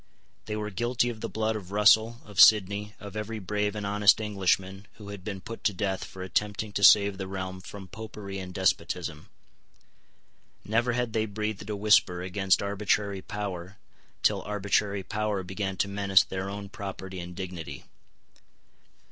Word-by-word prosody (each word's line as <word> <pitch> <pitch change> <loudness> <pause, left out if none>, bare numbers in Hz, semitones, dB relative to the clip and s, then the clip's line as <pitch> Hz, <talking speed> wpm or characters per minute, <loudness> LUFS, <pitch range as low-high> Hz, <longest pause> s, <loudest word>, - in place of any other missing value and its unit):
They 105 - -3
were 105 0 -3
guilty 120 +4 0
of 110 -2 -10
the - - -3
blood 110 0 -1
of 95 -3 -7
Russell, 110 +3 +4
of 105 -3 -7
Sidney, 105 0 +6
of 100 -1 -9
every 110 +1 -4
brave 105 +1 -1
and 105 -1 -4
honest 100 +1 +5
Englishman 95 -1 0
who 105 -2 -11
had 100 -2 -8
been 100 -1 -5
put 115 +3 -8
to 105 - +2
death 95 -1 -2
for 95 - -8
attempting 105 +3 -2
to 100 - -1
save 100 0 +7
the 95 - -4
realm 95 -1 -5
from 95 +1 -10
Popery 105 -1 -7
and 90 -1 -7
despotism. 90 -4 -1 1.4
Never 120 +3 +1
had 120 -2 -1
they 110 -1 +1
breathed 105 0 -4
a 105 - -1
whisper 100 -4 +3
against 95 +1 +1
arbitrary 100 -1 0
power 95 -2 -5 0.5
till - - +3
arbitrary 100 -1 0
power 105 -1 -2
began 95 +1 -4
to 100 - +1
menace 100 -1 +4
their 95 +1 -4
own 100 0 -6
property 95 -1 -7
and 90 0 -7
dignity. 85 -6 -7
100 Hz, 165 wpm, -28 LUFS, 95-105 Hz, 1.4 s, save